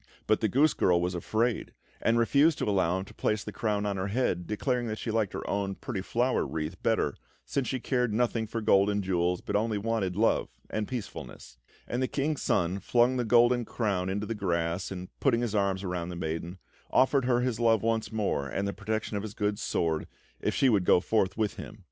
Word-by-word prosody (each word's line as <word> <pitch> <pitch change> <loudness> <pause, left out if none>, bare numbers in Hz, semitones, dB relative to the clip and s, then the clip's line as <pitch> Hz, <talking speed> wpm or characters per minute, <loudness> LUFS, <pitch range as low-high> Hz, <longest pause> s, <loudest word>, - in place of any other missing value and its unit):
But 110 - +3
the 110 - +2
goose 140 +9 +3
girl 90 -1 +3
was 90 +1 -1
afraid, 110 +7 -1 0.3
and 115 0 +3
refused 140 +7 +4
to - - -1
allow 95 -3 +2
him 95 - -4
to - - -14
place 105 -1 -1
the - - -6
crown 105 -2 -1
on 100 -1 -1
her 95 +1 -2
head, 100 -5 0
declaring 120 +3 -1
that 110 -1 -3
she 115 - -3
liked 110 -3 0
her - - -5
own 100 -1 -1
pretty 105 -4 -4
flower 120 +6 +1
wreath 80 +3 -4
better, 110 -11 +1 0.3
since 135 -3 -1
she 130 - -1
cared 125 -1 0
nothing 115 0 0
for 115 +1 -3
gold 100 -2 +4
and 100 0 0
jewels, 90 -1 0
but 100 - -3
only 110 0 +1
wanted 100 -4 -1
love 110 +3 +2 0.2
and 110 -1 -2
peacefulness; 95 - -7 0.3
and 120 - -2
the 130 - +1
King's 150 +2 -1
Son 90 0 +1
flung 120 +5 +2
the 125 - +1
golden 120 +1 +4
crown 100 -6 -1
into 100 +2 -2
the 115 - -3
grass, 85 -3 -1
and 90 -1 -6
putting 120 -4 +2
his 120 -3 -2
arms 100 -2 +1
around 90 -2 -3
the 90 - -5
maiden, 85 +2 -4 0.3
offered 130 0 +3
her 125 -1 +2
his 125 -3 -1
love 115 -2 +3
once 115 0 0
more 100 -10 -1
and 100 +7 -2
the 100 - -2
protection 110 +2 -3
of - - -2
his 105 -1 -7
good 105 0 -1
sword, 80 -2 -1 0.3
if - - -1
she 135 - +4
would 105 -7 +3
go 90 - +5
forth 95 +1 0
with 110 -2 -1
him. 110 - -8
105 Hz, 220 wpm, -29 LUFS, 95-115 Hz, 0.3 s, go